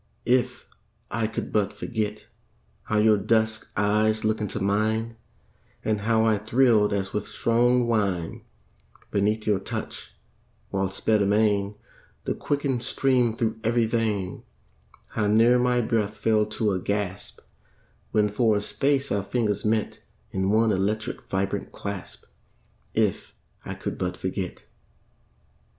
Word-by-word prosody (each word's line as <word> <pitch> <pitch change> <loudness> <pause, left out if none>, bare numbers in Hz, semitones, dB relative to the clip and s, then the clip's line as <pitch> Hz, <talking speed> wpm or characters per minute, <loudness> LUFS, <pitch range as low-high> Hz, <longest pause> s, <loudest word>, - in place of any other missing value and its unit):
If 125 +1 +1 0.5
I 115 -1 0
could 110 - -5
but 105 -2 +2
forget 110 -3 -3 0.6
How 105 - 0
your 105 0 +5
dusk 110 +1 0
eyes 110 +1 +2
look 110 0 +1
into 105 0 -3
mine, 110 +3 0 0.7
And 105 -1 0
how 110 +1 +2
I 110 -2 +3
thrilled 110 -1 +3
as 95 -1 -2
with 105 - -2
strong 120 +1 +2
wine 100 -7 -1 0.7
Beneath 105 +2 +1
your 105 -3 +2
touch; 95 - -6 0.6
while 95 -1 0
sped 105 +2 +1
amain 100 0 +2 0.5
The - - -1
quickened 140 -4 -1
stream 125 -2 +1
thro' 110 -2 0
ev'ry 115 +1 +2
vein; 110 -5 -1 0.7
How 105 -1 0
near 115 +4 +5
my 125 0 +2
breath 110 -2 -1
fell 110 -1 +2
to 110 0 0
a 95 - 0
gasp, 100 0 -3 0.7
When 105 -1 +3
for 110 0 +2
a - - -1
space 140 +5 0
our 100 - +1
fingers 105 0 -1
met 110 0 0 0.3
In 95 0 0
one 110 +1 +3
electric 105 +4 -2
vibrant 95 +1 -2
clasp, 100 -2 -7 0.7
If - - 0 0.3
I - - -5
could - - -5
but 90 -1 -2
forget. 95 -1 -4
110 Hz, 135 wpm, -25 LUFS, 100-115 Hz, 0.7 s, your